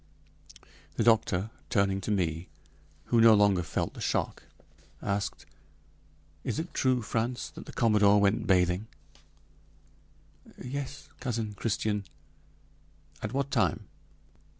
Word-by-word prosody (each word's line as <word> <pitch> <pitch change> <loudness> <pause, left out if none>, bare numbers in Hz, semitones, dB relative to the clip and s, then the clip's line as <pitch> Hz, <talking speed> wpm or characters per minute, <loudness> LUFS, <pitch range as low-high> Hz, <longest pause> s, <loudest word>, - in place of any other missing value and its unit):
The - - +1
doctor, 110 -3 +2 0.2
turning 100 -3 +1
to 100 - -5
me, 85 -4 -1 0.6
who 120 -1 +2
no 115 -1 +8
longer 100 -3 +4
felt 80 -3 -2
the - - -10
shock, - - -1 0.6
asked: 100 0 -3 1.0
"Is - - -2
it 165 +2 -4
true, 130 -2 +1
Frantz, 120 +3 -2
that - - -11
the - - -7
commodore 105 -3 +4
went 100 +1 +3
in - - -5
bathing?" 90 +2 +2 1.7
"Yes, 140 +1 -6
Cousin 115 -5 -3
Christian." 105 -1 -1 1.2
"At 105 - -3
what 140 0 -1
time?" 95 -10 0
105 Hz, 115 wpm, -29 LUFS, 100-120 Hz, 1.7 s, no